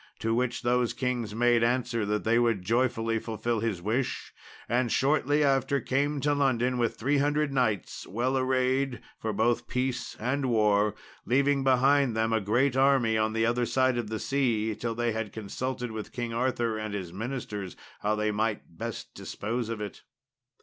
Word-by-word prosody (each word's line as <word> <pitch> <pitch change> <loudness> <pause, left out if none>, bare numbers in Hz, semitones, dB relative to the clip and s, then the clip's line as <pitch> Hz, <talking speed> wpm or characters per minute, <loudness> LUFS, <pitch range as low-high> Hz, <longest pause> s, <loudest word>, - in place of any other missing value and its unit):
To 115 0 -1
which 125 +1 -1
those 120 0 +2
kings 120 -4 -2
made 120 0 +3
answer 120 -2 0
that 105 0 0
they 115 +1 +3
would 115 -6 +1
joyfully 115 0 +1
fulfil 115 +1 -2
his 105 -6 -2
wish, 120 +6 -2 0.3
and 120 0 +1
shortly 145 +1 +2
after 135 0 +2
came 140 +3 0
to 145 +1 +2
London 130 -3 +1
with 115 -2 +1
300 145 +3 +1
knights, 115 -7 -1
well 125 +6 -1
arrayed 130 0 +1 0.2
for 110 - -2
both 110 +3 +1
peace 125 0 -2
and 130 +4 -1
war, 105 -3 +3 0.3
leaving 140 +2 +2
behind 135 -1 +3
them 110 0 +1
a 110 - +2
great 120 +6 +2
army 135 -4 +3
on 110 0 +1
the 115 0 +1
other 120 +1 +1
side 130 -2 +2
of 110 -3 -4
the 110 - -2
sea 115 -5 0
till 115 +2 -3
they 120 0 0
had 110 -1 -3
consulted 125 +3 -4
with 110 -1 -6
King 120 -2 -3
Arthur 120 -2 0
and 110 -1 -4
his 90 -4 -5
ministers 105 -3 -5 0.2
how 105 +1 0
they 105 0 0
might 105 -4 -2
best - - -6
dispose 115 +2 -4
of 115 -2 -3
it. 105 -2 -6
120 Hz, 170 wpm, -28 LUFS, 110-130 Hz, 0.3 s, made